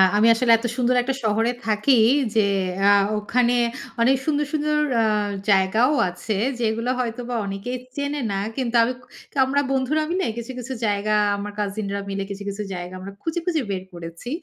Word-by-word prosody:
আমি 215 +2 +5
আসলে 235 +1 +2
এত 235 - -7
সুন্দর 250 0 +2
একটা 265 +2 -2
শহরে 220 +2 +2 0.2
থাকি 220 +4 +3 0.4
যে 215 -2 +4 0.4
আ - - +7 0.3
ওখানে 240 +3 +1 0.5
অনেক 260 +3 +5
সুন্দর, 295 -1 +1
সুন্দর 300 0 +1 0.2
আ - - +3 0.5
জায়গাও 215 +9 +3 0.2
আছে, 180 +4 -4 0.2
যেগুলো 230 +1 0
হয়তোবা 245 0 -3
অনেকে 195 +4 -5 0.2
চেনে 285 0 -2
না। 195 - -1 0.2
কিন্তু 245 -3 -1
আমি 250 - 0 0.4
কামরা 270 +1 +3
বন্ধুরা 270 +4 +1
মিলে 375 +2 0
কিছু, 235 +2 -5
কিছু 255 +2 -5
জায়গা, 205 0 0 0.2
আমার 205 +1 -5
cousin 205 0 -2
রা 200 - -2
মিলে 195 0 -2
কিছু, 200 0 -6
কিছু 200 +1 -4
জায়গা 180 0 -6
আমরা 190 +2 -8
খুঁজে, 325 +1 -2
খুঁজে 330 -4 +1
বের 185 -1 -3
করেছি। 170 +5 -8
230 Hz, 170 wpm, -23 LUFS, 200-260 Hz, 0.5 s, আ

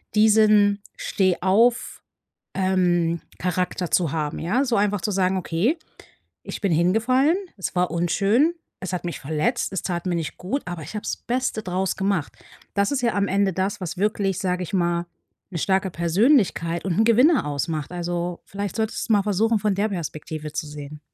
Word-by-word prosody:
diesen 210 -1 +5 0.2
Stehauf 195 +6 +2 0.6
ähm, 175 -3 +1 0.2
Charakter 180 -1 -1
zu 170 -6 +2
haben, 150 -2 -2
ja? 225 +12 +1
So, 240 -2 +1
einfach 205 0 +1
zu 210 - -2
sagen: 190 -1 +1
„Okay, 185 - 0 0.7
ich - - -6
bin 200 -4 +1
hingefallen. 230 - +3 0.2
Es 190 - -4
war 180 0 +1
unschön. 200 - +2 0.2
Es 185 -1 -5
hat 180 - -3
mich 175 - -4
verletzt. 155 - -1
Es 190 - -2
tat 175 -1 -3
mir 175 - 0
nicht 160 -2 -4
gut, 230 +11 -3
aber 175 -3 -5
ich 160 - -9
habe 210 - -4
das - - -3
Beste 250 -2 -2
draus 185 0 -1
gemacht.“ 190 -6 -1 0.4
Das 200 0 +1
ist 280 -2 0
ja 235 -1 +1
am 200 0 +1
Ende 195 0 +1
das, 195 +3 -1
was 180 +1 -4
wirklich, 200 -3 0
sage 180 -1 -1
ich 180 - -8
mal, 175 -1 +1 0.5
'ne 170 - -3
starke 190 +1 +1
Persönlichkeit 170 - +2
und 185 0 -1
'n - - +6
Gewinner 250 - +5
ausmacht, 150 +1 -3
also, 175 0 -3
vielleicht 200 -1 -5
solltest 220 +1 -2
du - - +5
mal 205 - +4
versuchen, 215 +2 +2
von 210 -2 0
der 205 +3 +1
Perspektive 155 -4 -5
zu 155 - -3
sehen. 150 0 -8
190 Hz, 180 wpm, -23 LUFS, 170-210 Hz, 0.7 s, n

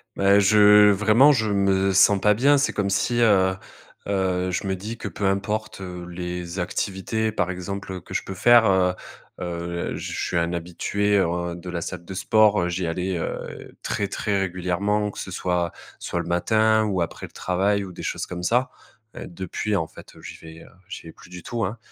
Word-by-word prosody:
Bah 100 +1 +4
je 105 0 +6
vraiment, 110 +8 +5
je 110 -6 +1
me 95 -1 +2
sens 100 +1 +5
pas 105 +1 +4
bien. 140 +7 +4
C'est 140 - 0
comme 100 -1 -1
si 110 +5 0
heu 95 -4 +4 0.5
heu, 95 -2 0
je 90 - -3
me 95 - 0
dis 105 +5 -7
que 110 - -6
peu 100 - -4
importe 100 +1 -2
les 90 0 -6
activités 100 +4 -2
par 95 -3 -1
exemple 95 +1 -6
que - - -12
je - - -1
peux 95 - -7
faire, 120 +4 +5
heu 95 -2 +3 0.5
heu, 85 0 -4
je - - -6
suis 85 - -2
un 85 +1 0
habitué, 100 +4 0
ouais, 85 0 -2
de 90 +1 -9
la 85 -1 -4
salle 90 0 -6
de 95 +2 -8
sport. 105 +1 +3
Heu, 90 - -1
j'y 90 -1 -2
allais 90 +2 -2
heu - - -6
très, 105 -2 -1
très 100 0 -1
régulièrement, 95 +3 -1
que - - -10
ce - - -6
soit, 90 -1 -1 0.3
soit 85 - -3
le 85 - -3
matin 110 +5 +2
ou 95 -4 -1
après 85 - -7
le - - -23
travail 100 +3 0
ou 95 - -8
des - - -10
choses - - -3
comme 90 -1 -7
ça. 125 +7 +1 0.4
Heu, - - -7
depuis, 95 +4 -3
en 80 -5 0
fait, - - -14
j'y - - -9
vais 80 0 -12
heu, - - -16 0.2
j'y - - -7
vais 80 - -10
plus - - -17
du 90 -1 -10
tout, 115 -1 -3
hein, 105 +6 -5
95 Hz, 205 wpm, -23 LUFS, 90-105 Hz, 0.5 s, je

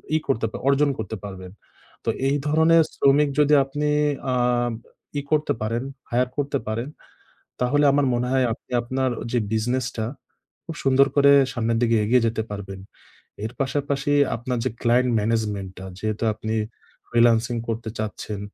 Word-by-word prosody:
ই - - +5
করতে 115 -4 +1
পার - - -6
অর্জন 145 +1 +3
করতে 110 - -4
পারবেন। 95 -2 -8 0.5
তো, - - +1 0.2
এই 145 - +2
ধরনের 160 +2 +5
শ্রমিক 140 +1 +4
যদি 150 0 +4
আপনি 145 +2 -2 0.5
আ - - +1 0.8
ই - - -3
করতে 155 0 +2
পারেন, 115 +3 -1 0.3
hire 125 +1 +1
করতে 140 -1 0
পারেন, 115 +4 -2 0.7
তাহলে 145 +4 +2
আমার 140 0 +2
মনে 120 +1 0
হয় 130 -1 +3
আপনি 110 - -11
আপনার 130 +2 -1 0.2
যে 125 - +2
বিজনেসটা, 120 +1 -1 0.6
খুব 165 - -7
সুন্দর 135 +1 +5
করে 140 0 +6 0.2
সামনের 115 -1 0
দিকে 115 -1 +3
এগিয়ে 120 +2 +3
যেতে 110 0 -2
পারবেন। 95 -1 -7 0.6
এর 110 - -4
পাশাপাশি 140 +1 -1 0.2
আপনার 125 +1 -3
যে 130 - 0
client 125 +1 +3
management 105 -3 -1
টা, 95 - -8
যেহেতু 110 +2 -2
আপনি 110 0 -4 0.5
freelancing 115 0 +3
করতে 115 0 -3
চাচ্ছেন, 105 -1 -4
120 Hz, 150 wpm, -23 LUFS, 110-140 Hz, 0.8 s, করে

